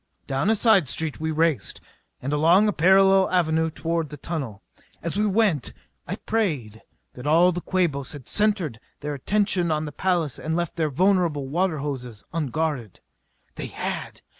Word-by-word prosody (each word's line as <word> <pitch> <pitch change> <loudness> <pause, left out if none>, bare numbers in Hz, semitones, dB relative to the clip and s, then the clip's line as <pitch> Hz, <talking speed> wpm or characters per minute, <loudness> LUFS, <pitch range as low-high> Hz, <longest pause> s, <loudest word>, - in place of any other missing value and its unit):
Down 135 +8 0
a 220 - +4
side 200 - +4
street 160 +1 -2
we 160 0 -2
raced, 160 -8 0 0.4
and 140 +3 -2
along 170 +8 +5
a 210 - +1
parallel 190 +2 +5
avenue 160 -3 +2
toward 165 0 -2
the 150 - -8
tunnel. 135 - -5 0.4
As 170 +1 -3
we 210 +1 +2
went 195 - +1 0.3
I - - -3
prayed 145 - -2 0.3
that 125 +3 -7
all 170 +4 +5
the 175 0 -4
Quabos 165 -9 -1
had 140 -5 -10
centered 195 - +1 0.2
their 150 0 -3
attention 185 +4 +1
on 155 0 0
the 150 - -6
palace 170 -3 -1
and 160 +1 -2
left 170 -1 -2
their 160 -2 0
vulnerable 170 -3 +1
water 170 +3 0
hoses 125 -6 -5
unguarded. 150 - -2 0.5
They - - -5
had! - - -5
160 Hz, 165 wpm, -24 LUFS, 145-185 Hz, 0.5 s, along